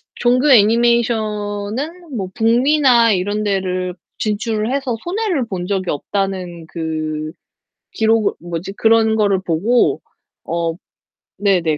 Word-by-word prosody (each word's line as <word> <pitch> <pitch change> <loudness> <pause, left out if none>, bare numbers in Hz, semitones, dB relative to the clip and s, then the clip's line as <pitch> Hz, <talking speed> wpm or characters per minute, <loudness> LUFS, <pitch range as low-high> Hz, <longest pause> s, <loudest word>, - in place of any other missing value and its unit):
종교 255 +4 +3
애니메이션은 230 - +1
뭐 190 -3 -3
북미나 240 0 +4
이런 205 +3 -1
데를 185 -3 -1 0.2
진출을 215 +1 -1
해서 270 -4 -1
손해를 360 - -1
본 185 -4 -4
적이 190 -2 -1
없다는 180 0 -3
그 155 -2 -4 0.6
기록을 220 -1 +2
뭐지 175 +2 -5
그런 220 0 +3
거를 200 -3 +2
보고 195 +8 +1 0.4
어 170 -1 -2 0.6
네네, 180 -6 +1
210 Hz, 230 characters per minute, -18 LUFS, 185-235 Hz, 0.6 s, 북미나